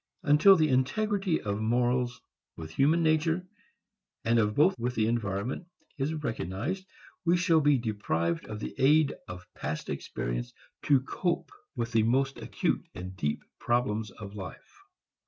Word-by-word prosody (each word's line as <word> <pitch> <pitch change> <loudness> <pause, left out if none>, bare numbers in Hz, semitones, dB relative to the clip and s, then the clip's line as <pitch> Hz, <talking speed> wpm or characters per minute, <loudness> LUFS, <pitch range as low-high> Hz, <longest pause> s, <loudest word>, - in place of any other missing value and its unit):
Until 150 +7 +7
the 155 -3 +3
integrity 195 +7 +1
of 100 0 -2
morals 120 +2 +1 0.4
with 80 -1 -7
human 155 - +3
nature 160 +3 +2 0.8
and 115 +1 +4
of 105 -1 +1
both 180 +7 +5
with 125 +2 -2
the 110 -1 +2
environment 115 - -2 0.3
is 135 +3 0
recognized, 145 - -3 0.4
we 175 +1 +3
shall 175 -2 +4
be 145 -1 +4
deprived 100 -8 -1
of 105 -1 -6
the - - -4
aid 145 +2 +5
of 90 0 -8
past 75 +3 -4
experience - - -4 0.3
to 140 -3 +5
cope 175 - -2 0.2
with 115 0 -2
the 115 -2 +4
most 135 +5 +1
acute - - -1
and 90 +1 -7
deep 75 -5 -2 0.2
problems 110 -3 0
of 100 0 -10
life. 95 -3 -9
125 Hz, 145 wpm, -29 LUFS, 105-155 Hz, 0.8 s, Until